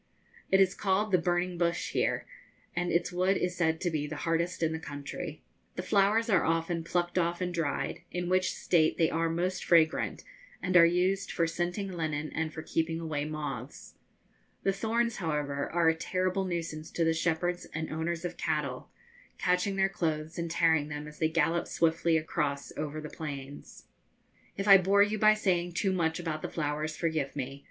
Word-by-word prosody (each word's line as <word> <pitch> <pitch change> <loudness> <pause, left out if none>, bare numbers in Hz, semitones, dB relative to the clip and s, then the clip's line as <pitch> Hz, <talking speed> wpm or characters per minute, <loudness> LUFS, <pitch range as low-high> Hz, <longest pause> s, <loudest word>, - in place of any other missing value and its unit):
It 190 - +5
is 190 -1 +4
called 200 +2 0
the 185 - +5
'burning 175 +1 0
bush' 170 -1 0
here, - - 0 0.5
and 175 0 0
its 170 +1 +1
wood 185 +2 +2
is 180 0 -1
said 160 -2 +1
to 175 - 0
be 150 -2 -1
the 155 - -5
hardest 170 +1 0
in 160 - +2
the 160 - -3
country. 145 -2 -7 0.3
The - - -4
flowers 205 +4 +3
are 190 -7 +3
often 165 +1 0
plucked 175 +1 0
off 170 0 0
and 180 -1 -2
dried, 165 -4 -2
in 175 0 -3
which 185 +1 +2
state 160 -3 +2
they 160 - +3
are 165 0 +1
most 180 +3 -1
fragrant 165 -2 +3 0.4
and 185 -1 -2
are 170 -1 +9
used 185 +3 +1
for 170 - +1
scenting 175 +4 -2
linen 155 -3 -3
and 160 -1 -1
for 160 0 -7
keeping 165 +1 -1
away 155 -3 -2
moths. 145 -4 -6 0.7
The 195 - +2
thorns, 230 +3 0
however, 150 -4 -2
are 170 -1 +4
a - - +4
terrible 185 +3 -1
nuisance 165 -3 -4
to 170 - +1
the 165 0 +3
shepherds 175 +2 -1
and 160 0 -4
owners 165 +2 -2
of 175 -1 -4
cattle, 150 -4 -2 0.5
catching 180 +2 +1
their 195 0 +3
clothes 160 -3 -2
and 170 0 -2
tearing 160 -3 +3
them 150 0 -6
as 150 0 -12
they 160 - +2
gallop 170 +1 +1
swiftly 165 0 +2
across 150 -3 -2
over 155 0 -4
the 150 - -7
plains. 140 -2 -8 0.7
If 195 +1 -2
I 195 -1 +10
bore 200 +2 +5
you 210 +1 -1
by 215 +1 +6
saying 175 -4 0
too 190 +3 +1
much 160 -3 0
about 160 -3 -3
the - - -4
flowers, 155 0 -2
forgive 160 -5 -1
me. 135 0 -4
170 Hz, 185 wpm, -30 LUFS, 155-180 Hz, 0.7 s, I